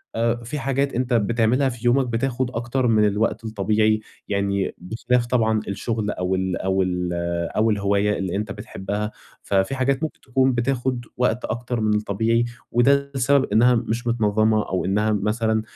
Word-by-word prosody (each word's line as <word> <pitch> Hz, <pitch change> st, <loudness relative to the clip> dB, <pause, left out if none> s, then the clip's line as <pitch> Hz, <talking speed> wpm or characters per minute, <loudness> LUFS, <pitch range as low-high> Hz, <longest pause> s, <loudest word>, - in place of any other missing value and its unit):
آآ 115 Hz, +1 st, +1 dB
في 135 Hz, +5 st, -4 dB
حاجات 140 Hz, +1 st, 0 dB
أنت 125 Hz, +1 st, -1 dB
بتعملها 115 Hz, +4 st, +2 dB
في 120 Hz, 0 st, -8 dB
يومك 125 Hz, +1 st, +3 dB
بتاخُد 125 Hz, +1 st, -1 dB
أكتر 120 Hz, +1 st, -1 dB
من 110 Hz, -2 st, +4 dB
الوقت 105 Hz, +3 st, 0 dB
الطبيعي 110 Hz, 0 st, +1 dB, 0.3 s
يعني 100 Hz, -1 st, -1 dB
بخلاف 120 Hz, +6 st, -1 dB
طبعًا 110 Hz, -3 st, +1 dB
الشُغل 105 Hz, +2 st, -2 dB
أو 90 Hz, +1 st, -1 dB
ال 95 Hz, -2 st, -1 dB
أو 95 Hz, 0 st, 0 dB
ال 90 Hz, -1 st, -1 dB, 0.5 s
أو 110 Hz, +1 st, +3 dB
الهواية 100 Hz, 0 st, +1 dB
اللي 95 Hz, -1 st, -2 dB
أنت 105 Hz, 0 st, -3 dB
بتحبّها، 105 Hz, 0 st, -4 dB, 0.3 s
ففي 100 Hz, +6 st, +1 dB
حاجات 135 Hz, +2 st, 0 dB
ممكن 160 Hz, -, -4 dB
تكون 130 Hz, 0 st, +1 dB
بتاخُد 125 Hz, 0 st, -1 dB
وقت 125 Hz, -1 st, 0 dB
أكتر 120 Hz, +2 st, -3 dB
من 105 Hz, -1 st, +2 dB
الطبيعي 110 Hz, +3 st, +1 dB, 0.3 s
وده 140 Hz, +3 st, +3 dB
السبب 135 Hz, +1 st, +3 dB
إنّها 120 Hz, +3 st, +5 dB
مش 115 Hz, +1 st, -2 dB
متنظَّمة 110 Hz, -1 st, +2 dB
أو 95 Hz, -1 st, -1 dB
إنّها 105 Hz, +3 st, +1 dB
مثلًا 110 Hz, +2 st, 0 dB
115 Hz, 160 wpm, -23 LUFS, 105-125 Hz, 0.5 s, إنّها